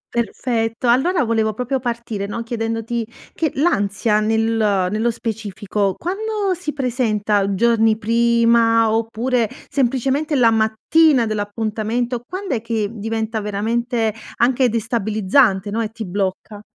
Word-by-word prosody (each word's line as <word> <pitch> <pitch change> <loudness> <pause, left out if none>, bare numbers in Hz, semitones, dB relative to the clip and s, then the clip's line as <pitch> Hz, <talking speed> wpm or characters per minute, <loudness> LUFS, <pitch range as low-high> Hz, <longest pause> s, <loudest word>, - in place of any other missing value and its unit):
Perfetto, 230 0 -1
allora 310 +6 +3
volevo 220 -2 +1
proprio 255 +2 -1
partire, 235 -5 -4
no, 230 +3 -4
chiedendoti 230 0 -3 0.3
che 315 - 0
l'ansia 210 - +1
nel 220 +1 +1 0.5
nello 220 +3 +1
specifico 205 -3 -2
quando 405 +2 -2
si 355 -3 -4
presenta? 215 -7 0
Giorni 225 0 +3
prima 230 0 +3
oppure, 230 +1 0 0.2
semplicemente, 270 +3 0
la 235 -3 +5
mattina 230 +5 +3
dell'appuntamento? 220 +3 -2
Quand'è 370 - -3
che 225 -3 -2
diventa 220 0 -3
veramente 225 +2 -1 0.2
anche 250 +1 +2
destabilizzante, 215 -2 +1
no, 225 +2 -1
e 220 - -2
ti 220 0 -7
blocca? 200 +2 -4
230 Hz, 115 wpm, -20 LUFS, 215-245 Hz, 0.5 s, la